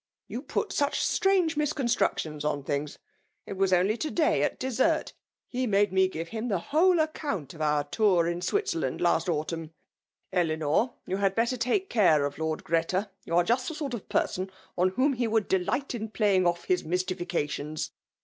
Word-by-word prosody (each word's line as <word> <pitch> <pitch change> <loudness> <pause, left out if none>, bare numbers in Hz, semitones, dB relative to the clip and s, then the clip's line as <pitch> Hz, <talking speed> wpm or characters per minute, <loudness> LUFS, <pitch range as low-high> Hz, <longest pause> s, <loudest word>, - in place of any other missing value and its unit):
*' - - -66
You - - -5
pxLt 415 - -2
such 285 -5 0
strange 380 -5 +2
misconatructions 245 - 0
on 145 -2 -1
thm^. 145 +1 -3 0.5
It - - -6
was 195 0 +1
only 185 +5 +3
to 310 - -2
day^ 320 -1 +2
at - - 0
dessert^ 265 +5 +1 0.3
he 255 0 -2
made 200 -2 +2
me 190 0 +4
give 165 -2 -6
him 225 +1 -4
the 200 -5 +1
whcdc 320 - +3
account 285 - -4
of 160 - -10
oar 150 -1 +2
tour 180 +2 +2
in 170 0 -1
Bwitzeilaiid 175 - -1
last 175 +2 +2
autunm/' 165 0 -2 0.6
£Unor, 165 - +1
you 190 - -2
had 195 -1 +1
better 235 +3 +1
take 255 - 0
care 170 - +4
of 145 +1 -5
Lord 160 -1 -2
€rreta. 180 +5 0
You 165 - -2
are 175 - +5
just 245 +7 +1
the 320 - -4
sort 290 -4 -4
of 235 - -6
person 185 +1 0 0.3
on 180 +1 +3
whom 260 +9 +2
he 240 -2 0
would 220 -2 +1
delight 195 +10 0
in 220 -2 -4
playing 200 -4 +2
off 175 0 0
his 185 - +1
mystifications." 170 -4 -2
190 Hz, 185 wpm, -28 LUFS, 165-255 Hz, 0.6 s, are